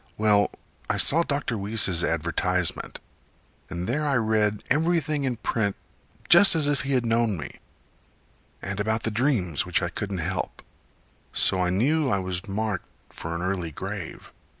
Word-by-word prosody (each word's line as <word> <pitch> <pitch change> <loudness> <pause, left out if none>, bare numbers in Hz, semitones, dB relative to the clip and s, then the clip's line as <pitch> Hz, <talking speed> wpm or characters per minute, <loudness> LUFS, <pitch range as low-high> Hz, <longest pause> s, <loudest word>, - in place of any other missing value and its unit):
Well, 105 -1 +4 0.4
I - - +1
saw 165 +4 +4
Dr. 140 -8 -2
Weese's 100 -4 0
advertisement, 85 +2 -1 0.7
And 90 0 -4
there 145 +6 0
I 145 -2 +1
read 110 -3 +1
everything 155 -1 +1
in 125 -2 0
print, 110 -3 -1 0.5
Just 195 +1 +7
as 155 -3 +2
if 145 -1 +1
he 140 0 -2
had 125 -2 +2
known 115 -3 +1
me; 75 - -8 1.0
And 100 +1 -4
about 110 +2 0
the 110 - -1
dreams 105 - +1
which 90 -1 0
I 85 - 0
couldn't 100 +2 -4
help. 85 +2 -3 0.7
So 95 -1 +4
I 90 - +1
knew 135 - +2
I 100 - +2
was 95 0 -4
marked 105 -1 -2 0.2
for 85 +1 -6
an 85 - -3
early 90 -3 -1
grave. - - -7
105 Hz, 155 wpm, -26 LUFS, 90-135 Hz, 1.0 s, Just